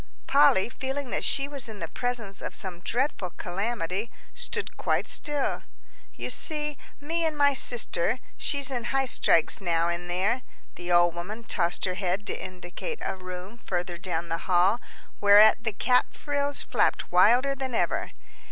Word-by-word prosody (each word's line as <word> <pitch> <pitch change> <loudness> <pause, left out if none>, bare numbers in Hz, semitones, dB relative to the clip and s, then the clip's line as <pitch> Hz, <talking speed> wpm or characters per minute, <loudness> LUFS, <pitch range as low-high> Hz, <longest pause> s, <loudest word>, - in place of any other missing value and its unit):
Polly, 280 -8 +5
feeling 265 +2 -4
that - - -1
she 275 0 +2
was 280 -5 -6
in 215 - -8
the - - -5
presence 235 -6 -2
of - - -5
some 180 -3 -6
dreadful 235 0 -1
calamity, 200 +1 -3 0.2
stood 485 - -4
quite - - 0
still. 295 -3 +2 0.5
"You - - -3
see, 300 -2 -2 0.2
me 330 +4 -2
and 315 -2 -1
my 285 -1 +4
sister 235 -5 +1 0.2
she's 280 -1 0
in 240 -2 -3
highstrikes 245 -8 +2
now 170 -2 +1
in 175 +1 -3
there." 195 +8 0 0.3
The 175 0 -6
old 175 -1 +5
woman 200 +7 -6
tossed 175 -5 -1
her 185 - -1
head 185 +2 -2
to - - -3
indicate 185 - -6
a - - -2
room 185 +4 -9
further 175 -5 -4
down 175 -2 -3
the 165 - -2
hall, 185 +6 +3 0.4
whereat 210 +2 +7
the 220 - 0
cap 250 +5 +1
frills 285 -1 -1
flapped - - 0
wilder 240 +10 +5
than 265 -2 -4
ever. - - 0
220 Hz, 160 wpm, -27 LUFS, 180-270 Hz, 0.5 s, whereat